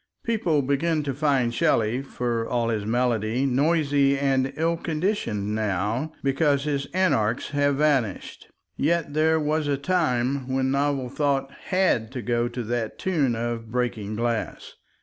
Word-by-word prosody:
People 175 -11 +1
begin 150 +3 0
to 140 -2 -2
find 135 -4 +1
Shelley—for 120 0 0
all 120 -2 0
his 105 -2 -2
melody—noisy 135 +5 +2
and 135 -1 +1
ill 165 +2 +1
conditioned 155 - -2
now 110 - -1
because 140 0 +2
his 140 -2 -2
Anarchs 140 - +1
have 145 0 +1
vanished, 135 -9 -1 0.3
yet 165 -1 0
there 160 +1 +3
was 155 0 0
a 140 -1 +1
time 140 -5 0
when 130 0 +1
novel 140 -2 0
thought 140 0 -1
HAD 185 - +1
to 125 -3 -5
go 120 +2 0
to 120 0 -5
that 115 0 -3
tune 150 -10 0
of 115 -1 -3
breaking 115 -3 -2
glass. 115 0 -3
135 Hz, 135 wpm, -25 LUFS, 120-150 Hz, 0.3 s, there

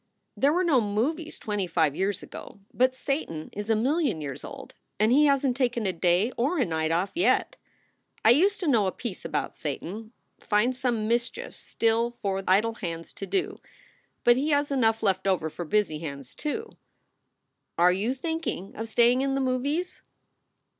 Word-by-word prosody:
There 280 - +3
were 360 +4 +2
no 295 -8 +4
movies 265 +11 -2
twenty 205 -3 -2
five 160 -4 +1
years 195 +2 -1
ago, - - -10
but 255 +1 +2
Satan 260 - -3
is 205 +1 -5
a 225 - +4
million 275 - +1
years 140 -3 -6
old, - - -9 0.3
and 215 +2 +4
he 295 +4 +6
hasn 275 -2 +2
t 255 - -14
taken 240 -3 +1
a 190 - 0
day 180 +6 +2
or 280 +9 +1
a 265 - +2
night 160 -2 -1
off 175 +4 0
yet. 350 +2 +2 0.7
I 225 - +8
used 380 +11 +4
to 350 - -1
know 225 -8 +3
a - - 0
piece 220 -3 -6
about - - -3
Satan 190 +9 -5 0.3
finds 240 +5 +1
some 235 -4 0
mischief 240 - -2
still 230 +1 0
for 195 -5 -3
idle 210 +5 +3
hands 165 -6 -6
to 195 - -7
do, 380 -2 -1 0.6
but 240 0 +5
he 285 +4 0
has 290 -1 +1
enough 225 -5 +2
left 190 -1 +1
over 165 -5 +1
for 175 - -6
busy 185 -4 +1
hands, 140 -5 -7
too. 435 +10 -4 1.1
Are 175 +1 +5
you 215 +8 -1
thinking 320 - -4
of 225 - -5
staying 240 +3 +4
in 270 0 0
the - - 0
movies?" 275 +7 -1
225 Hz, 180 wpm, -27 LUFS, 190-275 Hz, 1.1 s, I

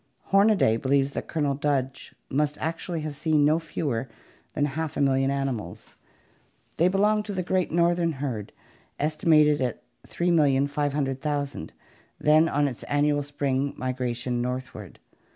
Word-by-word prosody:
Hornaday 195 - +4
believes 135 +2 +1
that - - -5
Colonel 145 -4 0
Dodge 135 -1 -2
must 150 +2 0
actually 165 +1 -3
have 150 -1 -5
seen 150 0 +2
no 155 +2 +3
fewer 140 -6 -3 0.5
than 145 - +2
half 155 +2 -4
a - - -1
million 135 -1 +2
animals. 135 -10 -4 0.8
They 170 - +4
belonged 210 +3 +2
to 205 - -5
the 185 -1 -2
great 185 0 0
southern 170 0 +2
herd, 130 -7 -4 0.5
estimated 150 -1 +3
at 125 -3 -2 0.2
3,500,000, 145 - 0 0.5
then 155 +2 +4
on 145 +1 +1
its 125 -4 -6
annual 145 0 +1
spring 140 -1 -2
migration 125 -1 -2
northward. 125 +1 -5
145 Hz, 130 wpm, -26 LUFS, 135-160 Hz, 0.8 s, Hornaday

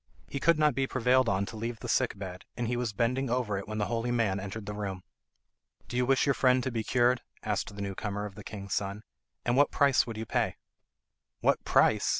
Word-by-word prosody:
He 140 - -4
could 170 +3 +4
not 150 -2 +4
be 135 +1 0
prevailed 130 -1 +3
on 95 +1 +1
to 110 - -8
leave 115 +1 -4
the - - -6
sick 125 -5 +1
bed, 95 -2 -7
and 120 -1 -1
he 120 - 0
was 120 -2 -1
bending 125 +5 0
over 115 -5 0
it 100 - -8
when 110 0 -4
the 105 - +1
holy 115 +1 -1
man 115 -5 +1
entered 100 +2 -6
the 105 - -4
room. 100 -3 -4 0.8
"Do - - -7
you 125 0 +2
wish 135 0 +3
your 140 - +3
friend 130 -1 +3
to 130 - -1
be 115 -2 -2
cured?" 125 +1 +3 0.2
asked 105 -1 -2
the 100 - -6
new 100 -1 -3
comer 105 +1 -3
of 105 - -7
the - - -10
king's 100 -2 -6
son. 100 +1 -2 0.4
"And 120 - +2
what 145 +2 +5
price 140 -3 +3
would 115 -2 -5
you 110 - -4
pay?" - - 0 0.9
"What - - +2
price?" - - +4
115 Hz, 235 wpm, -30 LUFS, 105-125 Hz, 0.9 s, what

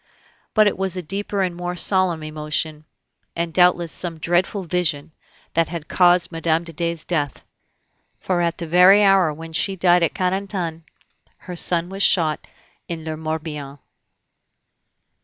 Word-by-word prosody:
But 215 -1 +6
it 205 - 0
was 190 -1 0
a 180 - -4
deeper 200 +3 -2
and 180 -2 -1
a - - -12
more 175 0 -4
solemn 180 -2 0
emotion, 155 0 -3 0.5
and 170 -1 -2
doubtless 175 -1 +3
some 170 -2 -3
dreadful 175 +5 0
vision, 165 -4 -2 0.4
that 165 -1 +1
had 165 -2 -6
caused 175 -1 +3
Mme. 165 0 0
de 165 -1 -6
Dey's 170 0 -2
death; 145 -6 -2 0.7
for 180 -2 -1
at 170 -1 -1
the 170 - -5
very 180 +5 +6
hour 195 -5 +4
when 160 +2 -9
she 190 +4 0
died 175 -1 +4
at 170 - 0
Carentan, 185 -3 -2 0.5
her 180 - -9
son 170 0 +1
was 195 +1 -5
shot 160 -6 +2 0.4
in 165 -2 -6
le 160 -1 -3
Morbihan. 155 -3 -5
170 Hz, 155 wpm, -21 LUFS, 160-185 Hz, 0.7 s, But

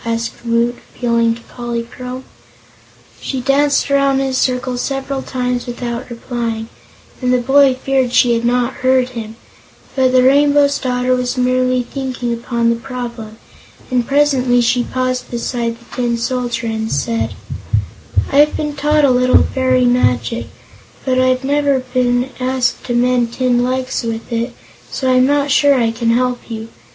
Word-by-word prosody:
asked 230 0 -3
Woot, 235 +1 0 0.2
appealing 235 -1 +1
to 235 - -13
Polychrome. 240 +2 -6 1.0
She 265 - -4
danced 280 +2 +2
around 275 -1 +3
in 270 0 0
a - - -4
circle 255 -1 0
several 270 +1 -3
times 250 -1 -3
without 240 0 -5
replying, 230 -2 -4 0.5
and 250 -1 +1
the 250 - +4
boy 270 +2 +4
feared 260 -1 0
she 245 -1 +4
had 230 0 0
not 245 +1 0
heard 255 0 +3
him; 225 -3 -7 0.6
but 260 -1 +3
the 255 0 +4
Rainbow's 285 +1 +4
Daughter 255 -1 0
was 250 0 -2
merely 255 0 +1
thinking 250 -2 -4
upon 235 0 0
the - - +1
problem, 235 -3 -7 0.5
and 245 -2 +1
presently 275 -4 +3
she 245 +1 +2
paused 255 0 -2
beside 235 -1 -3
the 235 - -20
Tin 240 -2 0
Soldier 240 -1 -2
and 220 0 -3
said: 230 -1 -1 1.0
"I've 295 +2 +4
been 300 -1 -2
taught 300 +1 +2
a 270 - +4
little 250 0 +4
fairy 255 -1 +1
magic, 230 - +1 0.6
but 255 -1 +1
I've 255 0 +2
never 285 0 +2
before 255 -1 -9
been 245 +1 +1
asked 255 -1 0
to 240 - -2
mend 245 -1 +1
tin 245 -1 +1
legs 255 +1 -1
with 230 0 -5
it, 235 +1 -2 0.3
so 260 -1 -1
I'm 255 0 +4
not 285 0 +1
sure 285 0 +4
I 230 -3 +2
can 230 0 -1
help 245 +1 0
you. 225 0 -6
250 Hz, 160 wpm, -17 LUFS, 235-260 Hz, 1.0 s, the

